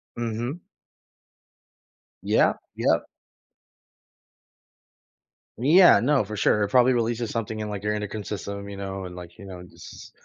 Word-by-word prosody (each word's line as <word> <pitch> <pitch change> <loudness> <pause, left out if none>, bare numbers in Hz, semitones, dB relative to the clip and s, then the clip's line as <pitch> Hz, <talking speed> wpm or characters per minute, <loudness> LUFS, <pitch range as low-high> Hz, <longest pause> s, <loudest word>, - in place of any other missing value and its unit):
Mhm. 120 +7 -4 1.6
Yeah. - - +3 0.2
Yep. - - +1 2.5
Yeah, 160 - +6
no, 135 0 +2
for 105 +1 -7
sure, 105 +1 +2
it 100 - -1
probably 125 0 +5
releases 120 -1 -1
something 110 -1 -4
in, 105 - -4
like, 100 -1 -6
your 105 0 0
endocrine 105 0 -4
system, 100 0 -6
you 100 - -8
know, 95 -1 -5
and, 90 -1 -9
like, 85 -1 -11
you 100 - -11
know, 90 -2 -9
jus 90 - -13
105 Hz, 135 wpm, -25 LUFS, 100-120 Hz, 2.5 s, Yeah